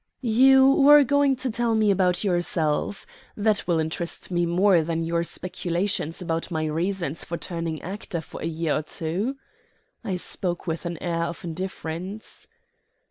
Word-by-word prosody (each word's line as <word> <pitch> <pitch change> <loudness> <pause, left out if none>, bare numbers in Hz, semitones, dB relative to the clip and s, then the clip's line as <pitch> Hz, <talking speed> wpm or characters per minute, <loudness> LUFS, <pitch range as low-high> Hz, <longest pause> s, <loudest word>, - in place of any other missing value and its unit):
"You 265 +3 +6
were 285 +2 +7
going 285 0 +3
to 255 0 -2
tell 235 0 0
me 215 -2 +3
about 180 -1 +2
yourself. 175 -1 0 0.3
That 210 -1 +1
will 170 -2 +2
interest 160 +3 -3
me 175 -1 +1
more 180 +1 +4
than 165 +1 -2
your 170 +1 0
speculations 175 -1 -2
as 165 -1 -1
to - - -9
my 155 0 -1
reasons 165 0 -2
for 170 - -4
turning 165 -3 -4
actor 185 -1 -5
for - - -10
a - - -3
year 165 -1 -1
or - - -1
two." 170 - -3 0.7
I 200 -5 -2
spoke 175 0 -2
with 170 0 -3
an 170 -1 -4
air 170 -1 0
of 170 - -6
indifference. 185 +3 -6
175 Hz, 160 wpm, -25 LUFS, 165-205 Hz, 0.7 s, were